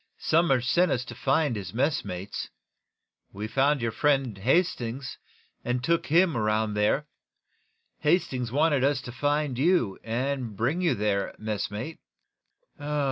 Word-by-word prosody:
Somers 140 -7 +2
sent 175 +2 +3
us 125 -1 -1
to - - -8
find 135 +1 +1
his 100 -1 -6
messmates. 100 - -2 0.8
We 105 +2 -5
found 135 +4 +2
your 115 - 0
friend, 135 -4 +1
Hastings, 130 - 0 0.4
and 125 0 -1
took 170 +4 +1
him 170 0 +4
around 110 -1 +1
there. 105 +8 +1 0.9
Hastings 130 -7 +1
wanted 145 -1 +2
us 140 0 +2
to 125 - -8
find 145 +1 -1
you, 145 - +2
and 120 -1 -2
bring 140 - 0
you 175 -3 +2
there, 100 -1 -1
messmate." 110 +6 -4
130 Hz, 130 wpm, -27 LUFS, 110-150 Hz, 0.9 s, him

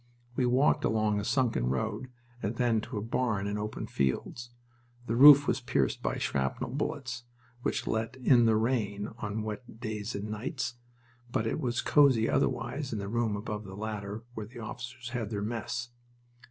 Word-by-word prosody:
We 125 0 +2
walked 130 +4 +3
along 110 -2 +2
a - - -3
sunken 115 - +1
road 65 - -2 0.3
and 105 +3 -2
then 120 -3 +2
to 115 0 -6
a 105 - -2
barn 110 -3 0
in 100 +1 -2
open 105 +1 -4
fields. 70 - -2 0.6
The 115 - -1
roof 145 +2 +10
was - - +1
pierced 70 - 0
by - - -1
shrapnel 65 -1 -1
bullets, 135 -4 -3 0.4
which - - -1
let 115 +2 -1
in 125 -2 +5
the 110 - +4
rain 110 -3 0
on 105 0 -3
wet 110 +1 -7
days 110 -1 -4
and 100 +1 -3
nights, 120 +4 -3 0.6
but 110 - 0
it 115 - -1
was 120 -5 0
cozy 135 -7 +5
otherwise 130 +2 0
in 110 - -2
the 100 -1 -4
room 115 -1 0
above 105 0 -4
the 95 -1 -9
ladder 105 0 -4
where 110 -3 -6
the 120 +3 -13
officers 120 +2 -7
had 120 -4 -3
their 100 -2 -2
mess. 120 +2 -3
115 Hz, 175 wpm, -30 LUFS, 105-125 Hz, 0.6 s, roof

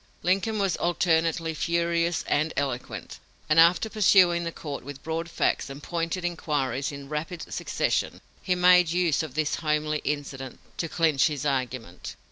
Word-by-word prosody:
Lincoln 195 +5 +1
was 195 -3 0
alternately 165 -1 +1
furious 170 +1 0
and 155 +2 +1
eloquent, 135 -3 -4 0.3
and 155 +1 +4
after 170 +6 +5
pursuing 185 -5 +4
the 170 - -2
court 145 -4 -7
with 140 +1 -9
broad 165 +1 -3
facts - - 0
and 140 +1 -9
pointed 170 +1 -2
inquiries 145 -6 -1
in 140 -1 -9
rapid 160 +3 -5
succession, - - -1 0.2
he 185 - 0
made 180 -1 +5
use 170 -3 +1
of 155 -5 -7
this 155 -1 0
homely 150 -1 0
incident 135 -3 -4 0.2
to 165 - -2
clinch 155 -5 +3
his 150 -3 -4
argument." 130 -9 -3
160 Hz, 150 wpm, -26 LUFS, 145-175 Hz, 0.3 s, after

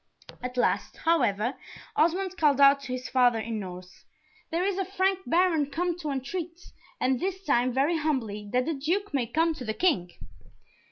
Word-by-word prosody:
At 250 0 -5
last, 245 - 0
however, 245 -8 +1 0.4
Osmond 365 +4 +1
called 295 -5 +3
out 280 0 +7
to 265 - -7
his 255 0 -4
father, 245 -3 +3
in 225 0 -3
Norse, 180 -1 -9 0.5
"There 335 +2 0
is 395 -1 -1
a - - +1
Frank 385 0 0
Baron 330 -4 +2
come 345 +3 -1
to 310 -3 -4
entreat, 330 +6 -4 0.4
and 255 -1 +1
this 380 +1 -3
time 255 -6 +2
very 280 +7 +1
humbly, 225 -9 -2
that 250 0 +1
the 325 - -1
Duke 340 +7 -2
may 255 -4 0
come 325 +7 +1
to 295 - -8
the 220 -2 -3
King." 245 - +1
285 Hz, 175 wpm, -27 LUFS, 245-345 Hz, 0.5 s, out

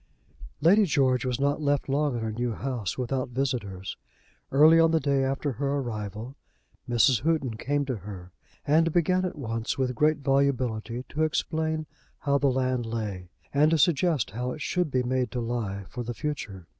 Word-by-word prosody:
Lady 200 +5 +6
George 130 -6 +2
was 125 -1 -1
not 145 +2 +1
left 145 -1 +1
long 140 -1 +1
in 115 - -4
her 110 - -2
new 120 +1 -2
house 125 -6 -3
without 130 0 -2
visitors. 120 -8 -3 0.5
Early 155 +4 +7
on 165 0 +5
the 160 0 +3
day 140 -3 +1
after 135 +2 -1
her 140 +3 -1
arrival, 115 -1 -4 0.5
Mrs. 120 0 +4
Houghton 150 -6 0
came 145 +5 -1
to 130 -4 -2
her, 95 -2 -9 0.3
and 165 +3 +3
began 180 +3 +2
at 180 - -4
once, 115 -3 -3
with 130 -1 0
great 150 +4 +2
volubility, 130 -4 0
to 155 - -3
explain 155 0 -1 0.3
how 140 -1 +1
the 140 - +2
land 130 -2 0
lay, 105 -6 -4 0.2
and 150 +2 +4
to 165 - +3
suggest 155 - +2
how 125 +4 -3
it 155 - -9
should 180 -3 0
be 130 -2 +1
made 130 0 0
to 125 - -2
lie 115 -4 -3
for 125 - -6
the 120 0 -5
future. 105 - -5
130 Hz, 180 wpm, -27 LUFS, 115-150 Hz, 0.5 s, Early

